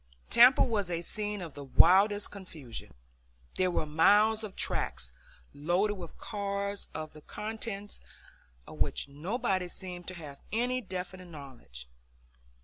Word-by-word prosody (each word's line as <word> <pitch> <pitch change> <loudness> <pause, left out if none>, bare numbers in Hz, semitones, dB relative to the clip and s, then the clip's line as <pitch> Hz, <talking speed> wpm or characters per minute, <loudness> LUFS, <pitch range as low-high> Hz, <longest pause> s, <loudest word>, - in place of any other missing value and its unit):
Tampa 245 +3 +8
was 210 -7 0
a 170 -1 -2
scene 210 0 -2
of 165 -4 -8
the 145 - -8
wildest 195 +9 +5
confusion. 160 - -9 0.6
There 185 0 +3
were 170 - 0
miles 210 +8 +4
of 210 -3 -6
tracks - - -2 0.4
loaded 175 +8 +1
with 180 -5 -9
cars 200 -1 -3
of 155 0 -5
the 155 - -12
contents 210 +1 -5 0.7
of - - -11
which - - 0
nobody 180 - -1
seemed 175 0 -7
to 185 - -5
have 150 -5 -9
any 250 +3 +1
definite 185 -2 -6
knowledge. 130 - -10
185 Hz, 135 wpm, -31 LUFS, 155-210 Hz, 0.7 s, Tampa